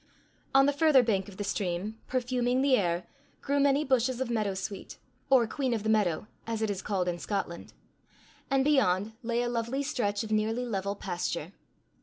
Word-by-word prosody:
On 270 Hz, 0 st, +7 dB
the 285 Hz, -, +2 dB
further 285 Hz, -3 st, +5 dB
bank 200 Hz, -4 st, 0 dB
of 190 Hz, -, -13 dB
the 205 Hz, -, -3 dB
stream, 200 Hz, +2 st, -2 dB
perfuming 250 Hz, 0 st, 0 dB
the 275 Hz, -2 st, +5 dB
air, 175 Hz, -5 st, 0 dB, 0.4 s
grew 285 Hz, 0 st, +1 dB
many 280 Hz, +1 st, +3 dB
bushes 255 Hz, -1 st, +1 dB
of 260 Hz, -2 st, -2 dB
meadow 210 Hz, -4 st, 0 dB
sweet, 190 Hz, +1 st, -6 dB, 0.3 s
or 260 Hz, -3 st, +6 dB
queen 255 Hz, +1 st, -1 dB
of 215 Hz, -, -3 dB
the 220 Hz, -, -1 dB
meadow, 205 Hz, -5 st, +1 dB, 0.2 s
as 225 Hz, -1 st, -2 dB
it 215 Hz, -, +1 dB
is 195 Hz, -2 st, -4 dB
called 190 Hz, -3 st, -1 dB
in 175 Hz, -1 st, -2 dB
Scotland; 175 Hz, -3 st, -4 dB, 0.8 s
and 270 Hz, -1 st, +2 dB
beyond 220 Hz, -8 st, +2 dB
lay 235 Hz, 0 st, 0 dB
a -, -, -1 dB
lovely 240 Hz, +3 st, -1 dB
stretch 220 Hz, -7 st, -1 dB
of 220 Hz, -, -7 dB
nearly 220 Hz, +3 st, 0 dB
level 200 Hz, -3 st, -2 dB
pasture. 175 Hz, -4 st, -3 dB
225 Hz, 185 wpm, -29 LUFS, 200-260 Hz, 0.8 s, On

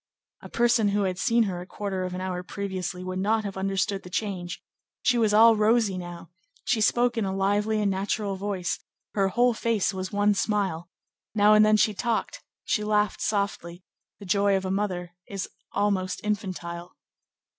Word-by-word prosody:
A -, -, -10 dB
person 235 Hz, -2 st, +3 dB
who 200 Hz, 0 st, +1 dB
had 185 Hz, -2 st, -2 dB
seen 235 Hz, +3 st, +3 dB
her 185 Hz, -4 st, -3 dB
a 180 Hz, -, -10 dB
quarter 195 Hz, -2 st, -3 dB
of 180 Hz, 0 st, -4 dB
an 185 Hz, -, -4 dB
hour 185 Hz, -1 st, -3 dB
previously 185 Hz, -1 st, -4 dB
would 185 Hz, 0 st, -4 dB
not 215 Hz, +3 st, +1 dB
have 200 Hz, -2 st, -5 dB
understood 195 Hz, +1 st, -1 dB
the 180 Hz, -, -11 dB
change; 180 Hz, -3 st, -3 dB, 0.4 s
she 245 Hz, -, +3 dB
was 220 Hz, -2 st, +3 dB
all 225 Hz, +2 st, +7 dB
rosy 215 Hz, -1 st, +3 dB
now; 175 Hz, -1 st, -8 dB, 0.3 s
she 225 Hz, -, +1 dB
spoke 240 Hz, +2 st, +2 dB
in -, -, 0 dB
a 190 Hz, -, -1 dB
lively 205 Hz, +3 st, +1 dB
and 205 Hz, -2 st, +1 dB
natural 200 Hz, +1 st, -1 dB
voice; 190 Hz, -2 st, -2 dB, 0.3 s
her 195 Hz, -2 st, +2 dB
whole 240 Hz, +5 st, +3 dB
face 225 Hz, -3 st, 0 dB
was 185 Hz, 0 st, -4 dB
one 205 Hz, 0 st, +3 dB
smile; 195 Hz, -5 st, -1 dB, 0.5 s
now 210 Hz, 0 st, +6 dB
and 215 Hz, 0 st, +7 dB
then 215 Hz, 0 st, +5 dB
she 215 Hz, 0 st, +3 dB
talked, 235 Hz, -, -2 dB, 0.2 s
she 210 Hz, -, 0 dB
laughed 210 Hz, -1 st, +1 dB
softly; 195 Hz, -4 st, -2 dB, 0.3 s
the 200 Hz, -, -11 dB
joy 200 Hz, +1 st, +3 dB
of 190 Hz, -, -4 dB
a 185 Hz, -, -1 dB
mother 185 Hz, -3 st, -2 dB
is 195 Hz, -1 st, -4 dB, 0.2 s
almost 195 Hz, -2 st, 0 dB
infantile. 180 Hz, -4 st, -4 dB
200 Hz, 180 wpm, -26 LUFS, 185-215 Hz, 0.5 s, all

